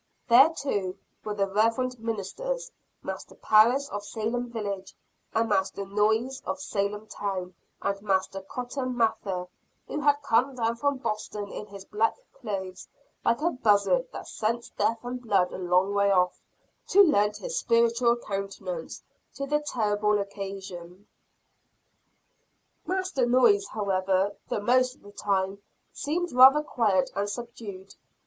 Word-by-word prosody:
There, 255 +6 +8
too, 205 - -3 0.3
were 210 -1 -3
the 200 -1 +1
reverend 230 +5 +1
ministers, 460 - -4 0.3
Master - - -6
Parris 235 +6 +4
of 205 0 -5
Salem 230 +3 -3
village, 200 -4 -5 0.4
and 225 0 +1
Master 195 -1 0
Noyes 220 +6 +1
of 285 - -3
Salem 205 -5 -2
town, 190 -4 -4 0.3
and 200 0 -1
Master 195 -1 0
Cotton 250 +3 -4
Mather, 210 -6 0 0.4
who 295 - -3
had 290 0 +3
come 260 +1 +2
down 230 -1 0
from 285 +2 0
Boston 210 -4 -4
in 210 - -7
his 200 -1 -11
black 220 +3 +1 0.2
clothes, 195 -6 -6 0.4
like 235 - +2
a 340 +2 +2
buzzard 250 - +2
that - - -8
scents 235 +2 -2
death 230 - +1
and 250 +1 -5
blood 195 -6 +2
a - - -5
long 180 +2 +2
way 200 0 +3
off, 180 -2 +2 0.5
to 400 +2 +7
lend 210 - +3
his - - -3
spiritual 235 - +3
countenance 205 - -5 0.3
to 275 - -3
the 295 +2 +1
terrible 210 -7 +1
occasion. 195 -2 -7 1.8
Master 370 -9 0
Noyes, 395 - +4
however, 195 -1 0 0.2
the - - -1
most 255 +3 +3
of - - -27
the 205 - -13
time, 195 -1 -1 0.3
seemed 345 +4 -2
rather 265 +4 +8
quiet 210 -10 +1
and 200 +1 -1
subdued. 205 -4 -8
220 Hz, 140 wpm, -27 LUFS, 200-255 Hz, 1.8 s, There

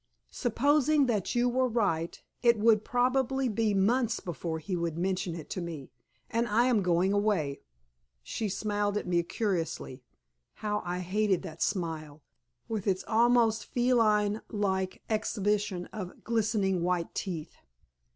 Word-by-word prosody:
Supposing 285 +4 +2
that 215 -5 -1
you 240 +1 +3
were 255 +1 +2
right, 195 -9 0 0.2
it 235 -2 +5
would 215 0 +4
probably 255 +2 +1
be 215 -2 +1
months 230 +4 +2
before 170 -1 -4
he 160 +4 -4
would 170 -2 -2
mention 185 -1 -1
it 160 -3 -8
to 185 - -3
me, 160 -6 -7 0.4
and 235 0 0
I 230 +3 +3
am 245 -5 +3
going 180 +1 +2
away." 205 -9 0 0.6
She 210 - -3
smiled 205 +1 -1
at - - -3
me 175 -1 +2
curiously. 170 - -3 0.5
How 210 -1 -2
I 180 0 -3
hated 195 +1 +1
that 160 +1 -8
smile, 160 -6 -2 0.4
with 220 -3 -3
its 190 -1 +1
almost 230 -1 +3
feline 220 -4 +2
like 190 -3 -1
exhibition 210 -3 0
of 190 -4 -7
glistening 215 -5 +1
white 175 -1 -1
teeth! 170 -6 -4
205 Hz, 140 wpm, -29 LUFS, 180-230 Hz, 0.6 s, it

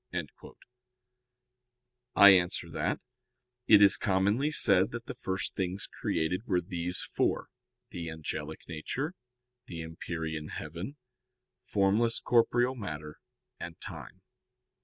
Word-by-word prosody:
I 100 - +10
answer 90 -2 +3
that, - - -1 0.7
It 105 -2 +8
is 100 - +6
commonly 100 +7 +2
said 100 -9 +4
that 120 0 -5
the - - -5
first 95 -6 -3
things 95 +1 -2
created 90 +8 -2
were 90 - +2
these 90 0 -2
four - - -1 0.4
the 85 -2 -5
angelic 80 -1 -5
nature, 130 - -4 0.5
the 85 -2 -6
empyrean 80 -1 -5
heaven, 85 - -6 0.7
formless 105 +3 +2
corporeal 120 +1 +3
matter, 75 - -7 0.4
and 85 -1 -7
time. 95 - -10
95 Hz, 105 wpm, -30 LUFS, 80-110 Hz, 0.7 s, I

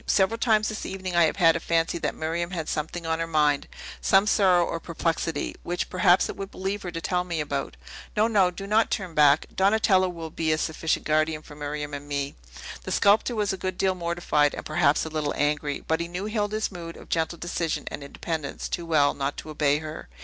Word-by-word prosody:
Several 210 +4 +2
times 220 -3 +3
this 215 - -5
evening 185 -2 -4
I 170 -1 +6
have 155 - 0
had 165 -4 +5
a - - 0
fancy 165 +1 0
that - - -2
Miriam 165 +2 -2
had 165 -4 -4
something 160 +3 -3
on 160 0 0
her 165 - -1
mind, 150 -3 +2 0.3
some 195 +1 +4
sorrow 185 -5 +4
or 165 - -3
perplexity, 165 -2 -2
which, 175 +1 -3
perhaps, 185 0 +4
it - - -6
would 195 0 -6
relieve 195 +2 -3
her 180 - -5
to 165 - -5
tell 180 +1 0
me 170 -3 -3
about. 145 -2 -3 0.4
No, 215 +1 +4
no; 200 -5 +4
do 190 +2 -7
not 215 +3 +3
turn 185 -4 -3
back! 145 -2 +5
Donatello 190 -1 +3
will 165 -2 -7
be 160 0 -1
a 155 - +2
sufficient 160 +1 -1
guardian 155 0 +1
for 150 - -12
Miriam 145 0 -5
and 145 0 -6
me." 140 -1 -2 0.5
The - - -5
sculptor 215 +4 +3
was 210 -3 0
a - - -4
good 185 -1 -3
deal 190 -1 +2
mortified, 170 -4 +1
and - - -7
perhaps 155 -1 +2
a - - -4
little 155 -2 -2
angry: 145 -1 0
but 160 0 +1
he 170 - -2
knew 180 +3 -5
Hilda's 215 0 -1
mood 170 -2 -8
of - - -13
gentle 165 +1 0
decision 170 -1 -2
and 145 - -6
independence 155 +1 -4
too 170 -1 -3
well 150 -3 +3
not 140 0 -3
to 155 - -7
obey 145 -1 +2
her. 155 - -7
165 Hz, 220 wpm, -26 LUFS, 155-190 Hz, 0.5 s, I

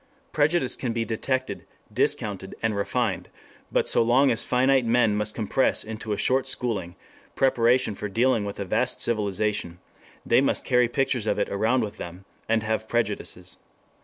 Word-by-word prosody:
Prejudice 150 -2 +2
can 120 -3 -3
be 115 0 -1
detected, 130 +4 -2 0.3
discounted, 95 -2 -1
and 110 -2 +1
refined, 105 0 -1 0.4
but - - +1
so - - +3
long 125 +4 +4
as 115 - 0
finite 130 +1 +3
men 115 -2 +3
must 105 0 -2
compress 115 +4 +1
into 110 0 -6
a 105 - 0
short 130 +4 +1
schooling 100 -9 -1 0.4
preparation 125 -3 +3
for 105 +1 -5
dealing 115 +1 +2
with 100 0 -6
a 100 - -2
vast 90 - 0
civilization, 105 -5 -1 0.5
they 120 - +4
must 140 - 0
carry 125 -1 +3
pictures 130 -3 0
of 105 - +1
it - - 0
around 110 +5 +1
with 105 -1 -6
them, 90 +2 -8 0.2
and 110 -1 +2
have 110 0 -2
prejudices. 120 0 -2
115 Hz, 160 wpm, -25 LUFS, 105-125 Hz, 0.5 s, long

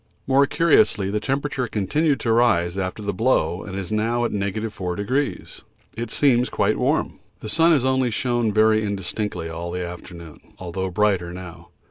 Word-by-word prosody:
More 135 +1 +4
curiously 165 - +3
the 105 - 0
temperature 135 +2 -2
continued 135 - 0
to 115 - 0
rise 110 -7 +3
after 95 +2 -4
the 100 0 -2
blow 95 -6 +1
and 95 - -8 0.2
now, 115 +3 0
at - - -2
4°, 100 +4 -3 0.3
it 115 0 -4
seems 125 -1 +2
quite - - 0
warm. - - 0 0.2
The - - -6
sun 165 +9 +4
has 140 -6 +3
only 130 -1 +2
shown 120 0 0
very 110 +1 +3
indistinctly 100 -2 -3
all 85 +1 -5
the 90 0 -3
afternoon, 85 -2 -10 0.2
although 95 +1 -4
brighter 95 -2 +1
now. 90 -2 -10
105 Hz, 155 wpm, -22 LUFS, 95-125 Hz, 0.3 s, More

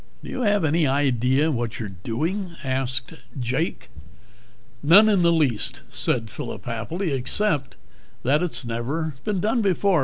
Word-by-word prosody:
"Do - - -7
you 255 - -3
have 205 -6 +2
any 155 0 +2
idea 135 +2 +2
what 120 -3 -3
you're 110 -3 -4
doing?" 170 - -2
asked 130 0 -2 0.3
Jake. 130 +7 -2 0.9
"None 175 +9 +7
in 205 -4 +3
the 170 0 +4
least," 145 -10 +1
said 110 -3 0
Phillip 100 - -7
happily, 155 - -3
"except 140 +3 0 0.5
that 145 +5 +3
it's 140 -8 -2
never 135 +8 -2
been 210 -3 0
done 225 +5 +1
before. 195 -2 +2
145 Hz, 145 wpm, -24 LUFS, 125-180 Hz, 0.9 s, None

